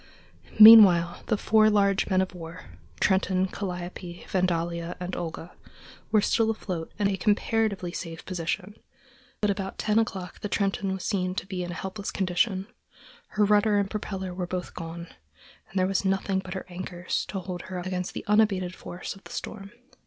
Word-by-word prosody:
Meanwhile, 195 -6 +9
the 220 - +1
four 215 +1 +4
large 200 -2 +2
men 185 0 +3
of 190 - -3
war, 170 0 -9 0.4
Trenton, 190 0 +2
Calliope, 180 -2 -6
Vandalia, 170 -2 -1
and 180 0 -4
Olga, 165 0 -6 0.6
were 215 - +5
still 225 0 +2
afloat 185 -7 -4
and 205 -1 +2
in 200 - 0
a - - -2
comparatively 210 -3 +1
safe 165 -2 -7
position; 180 +2 -3 0.7
but 210 -1 +3
about 195 -1 -4
ten 215 +1 +2
o'clock 190 -5 -3
the 210 - -4
Trenton 195 -1 0
was 190 -1 -4
seen 185 -2 -1
to - - -3
be 185 -2 -4
in 175 - -5
a 175 - -5
helpless 195 +3 -5
condition; 190 +1 0 0.6
her 210 0 +1
rudder 210 0 +4
and 200 -1 0
propeller 190 -3 -4
were 180 -1 -4
both 180 0 -4
gone, 170 0 -7 0.6
and 195 - -6
there 185 - +3
was 195 +1 0
nothing 195 0 0
but 190 -1 -7
her 190 - -5
anchors 180 0 -4
to 195 - -5
hold 180 -1 -6
her 185 - -4
up 180 - -5
against 185 -1 -3
the - - -5
unabated 200 -4 +2
force 175 - -7
of 195 - -17
the - - -11
storm. 200 -2 -6
190 Hz, 180 wpm, -27 LUFS, 180-205 Hz, 0.7 s, Meanwhile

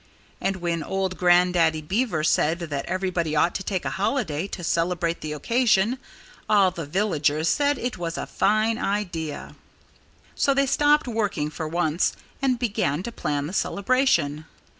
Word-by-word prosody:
And 195 0 0
when 170 -2 -2
old 190 +2 -2
Grandaddy 175 -3 +3
Beaver 190 -2 0
said 160 +1 +2
that 155 -5 -4
everybody 180 -3 -1
ought 170 +3 +3
to 190 - -4
take 190 -2 -3
a - - -1
holiday 190 - -1
to 180 - -7
celebrate 170 0 0
the 155 - -5
occasion, 230 - +2 0.5
all 200 -3 +5
the 165 -4 -6
villagers 155 -4 0
said 290 -1 +2
it 245 -5 -4
was 170 -1 -3
a - - -3
fine 215 +3 +1
idea. 175 -7 -3 0.8
So 275 - +2
they 275 0 +3
stopped 295 +1 +3
working, 205 -10 -1
for 160 0 -5
once, 165 0 0 0.3
and 260 -2 +2
began 195 - -1
to 235 - -5
plan 145 -9 -2
the 165 - -6
celebration. 195 - +1
180 Hz, 155 wpm, -24 LUFS, 160-215 Hz, 0.8 s, all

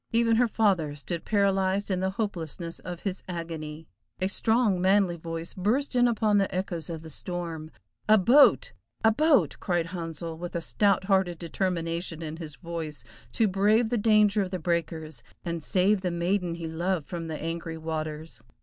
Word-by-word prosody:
Even 230 -1 +3
her 245 +1 +4
father 190 -10 +1
stood 165 +3 -5
paralyzed 195 -1 +1
in 185 - +1
the 190 +1 0
hopelessness 170 -5 -3
of 175 -1 -7
his 195 -2 -3
agony. 165 -3 -6 0.3
A 185 +1 0
strong, 220 -3 +2
manly 190 -1 +3
voice 165 0 -6
burst 240 +9 0
in 245 0 +5
upon 215 -3 +2
the 195 - 0
echoes 180 -2 -3
of 160 -1 -5
the 160 - -9
storm. 165 -1 -4 0.4
"A 215 - +8
boat! 280 - +5 0.3
a 225 - +6
boat!" 300 +4 +3
cried 175 -3 0
Handsel, 165 -1 -5
with 175 0 -6
a - - +1
stout 200 +3 +2
hearted 190 -3 +2
determination 170 -1 -2
in 155 0 -5
his 155 -3 -7
voice 165 -3 -6 0.3
to 225 - +3
brave 210 +4 +3
the 240 - +2
danger 210 -1 +4
of 190 - -2
the 185 - -3
breakers, 160 -5 -2 0.2
and 170 -2 -3
save 190 +5 +2
the 185 - -1
maiden 175 0 0
he 170 -1 -6
loved 165 0 -1
from 170 -2 -5
the 160 -1 -4
angry 165 0 -4
waters. 155 -5 -5
180 Hz, 175 wpm, -27 LUFS, 165-200 Hz, 0.4 s, A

